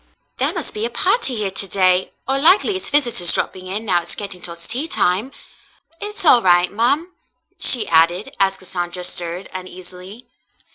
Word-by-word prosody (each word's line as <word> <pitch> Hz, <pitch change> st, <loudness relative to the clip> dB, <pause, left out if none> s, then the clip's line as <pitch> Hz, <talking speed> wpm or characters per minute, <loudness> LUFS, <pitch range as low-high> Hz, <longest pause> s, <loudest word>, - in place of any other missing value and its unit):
"There -, -, +1 dB
must -, -, -5 dB
be 210 Hz, -, -4 dB
a 235 Hz, -, -1 dB
party 270 Hz, -, 0 dB
here 210 Hz, -3 st, -2 dB
to 195 Hz, +1 st, 0 dB
day, 185 Hz, -1 st, +1 dB, 0.2 s
or 270 Hz, +1 st, 0 dB
likely 370 Hz, +6 st, +4 dB
it's 375 Hz, -, -4 dB
visitors 240 Hz, -12 st, +4 dB
dropping 185 Hz, 0 st, -3 dB
in, 205 Hz, +4 st, -4 dB
now 180 Hz, -4 st, +1 dB
it's 170 Hz, -, -7 dB
getting 200 Hz, -3 st, -6 dB
toward 170 Hz, -1 st, -3 dB
tea 235 Hz, -, -4 dB
time. 195 Hz, -, 0 dB, 0.7 s
It's 420 Hz, -2 st, -5 dB
all 250 Hz, -6 st, +6 dB
right, 175 Hz, -2 st, +3 dB
ma'm," 280 Hz, -, 0 dB, 0.5 s
she 235 Hz, -4 st, +4 dB
added, 170 Hz, +4 st, +2 dB
as 195 Hz, 0 st, +1 dB
Cassandra 180 Hz, -1 st, -5 dB
stirred 175 Hz, +1 st, -3 dB
uneasily. 185 Hz, +4 st, -10 dB
195 Hz, 170 wpm, -19 LUFS, 180-250 Hz, 0.7 s, all